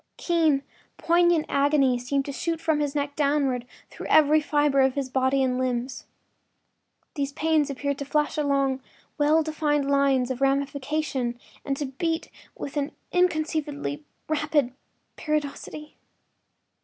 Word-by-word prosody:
Keen, 320 -5 +2 0.3
poignant 345 -1 +3
agonies 275 -4 +2
seemed 275 0 0
to 280 - -4
shoot 330 +3 -2
from 320 -2 +1
his 290 -1 -1
neck 285 0 -2
downward 280 -4 +1 0.2
through - - -8
every 305 0 +5
fiber 290 -2 +2
of 265 -1 +2
his 275 -2 -2
body 265 +1 +2
and 255 -1 0
limbs. 255 0 -2 1.1
These 285 -1 -3
pains 310 -1 +1
appeared 280 0 -3
to 280 - -4
flash 300 +1 0
along 275 -3 +1 0.4
well 305 +2 +4
defined 300 -2 0
lines 275 -2 +2
of 255 0 -5
ramification 275 -2 -1 0.2
and 275 -1 -2
to 290 - -2
beat 325 +5 -3 0.3
with 285 - -6
an 285 0 -1 0.2
inconceivably 310 -4 -1 0.2
rapid 300 -4 +1 0.4
periodicity. 300 0 -4
285 Hz, 130 wpm, -25 LUFS, 270-305 Hz, 1.1 s, every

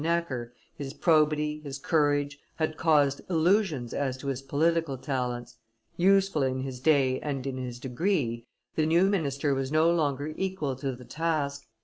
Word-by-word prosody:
Necker, 160 -8 -1 0.2
his 140 -1 -6
probity, 150 -2 +2
his 140 -2 -6
courage, 145 -1 +1 0.2
had 155 -1 -1
caused 145 -4 +3
illusions 165 - +2
as 135 -2 -1
to 140 +1 -5
his 135 -1 -3
political 155 +1 +1
talents; 125 -3 -3 0.4
useful 195 -2 +3
in 130 -1 0
his 130 -1 -5
day 135 -2 +3
and 135 -3 -4
in 135 -1 -3
his 125 -2 -5
degree, 125 - -1 0.3
the 155 -1 +1
new 170 +3 +4
minister 145 -8 +1
was 135 0 -2
no 160 +2 +4
longer 150 -2 0
equal 185 -8 -2
to 135 -1 -3
the 125 0 -13
task. 150 -4 -2
145 Hz, 155 wpm, -28 LUFS, 130-160 Hz, 0.4 s, new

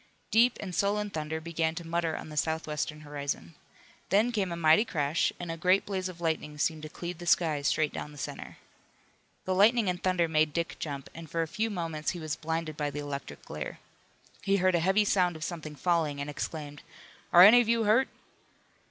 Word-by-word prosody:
Deep 235 +2 +4
and 185 -3 -6
sullen 205 +2 0
thunder 160 -1 -3
began 160 0 -1
to 170 - -6
mutter 165 -1 -1
on - - -8
the 155 - -8
southwestern 155 -1 -2
horizon. 145 - -5 0.6
Then 210 +6 +3
came 200 -6 -1
a - - -2
mighty 160 +4 +5
crash 150 -6 0
and 175 -2 -4
a 165 - -5
great 185 +4 +3
blaze 190 -2 -2
of 175 -2 -10
lightning 160 -3 -2
seemed 155 +1 0
to 155 - -7
cleave 175 +1 -6
the 175 - -8
sky 160 -4 +3
straight 155 +1 +1
down 150 - -6
the 145 - -13
center. 140 - -7 0.9
The 185 - 0
lightning 215 +3 +4
and 180 0 -3
thunder 185 -2 +2
made 155 -1 +2
Dick 170 +1 -2
jump, 140 -3 -5
and 165 -1 -10
for 165 +2 0
a - - -4
few 220 +7 -1
moments 165 -6 -3
he - - -7
was 155 -2 -3
blinded 160 -1 -3
by 150 -1 -1
the 145 - -7
electric 140 - -6
glare. - - -6 0.6
He 195 0 +2
heard 185 0 +3
a 170 - +3
heavy 190 +5 +3
sound 180 -4 +2
of 155 - -7
something 155 -2 -5
falling, 155 -2 0
and 145 +1 -4
exclaimed: 145 -1 -5 0.5
"Are 175 - +9
any 230 +5 +9
of 230 - -2
you 230 -1 +3
hurt?" 220 +5 +4
165 Hz, 205 wpm, -29 LUFS, 155-185 Hz, 0.9 s, Are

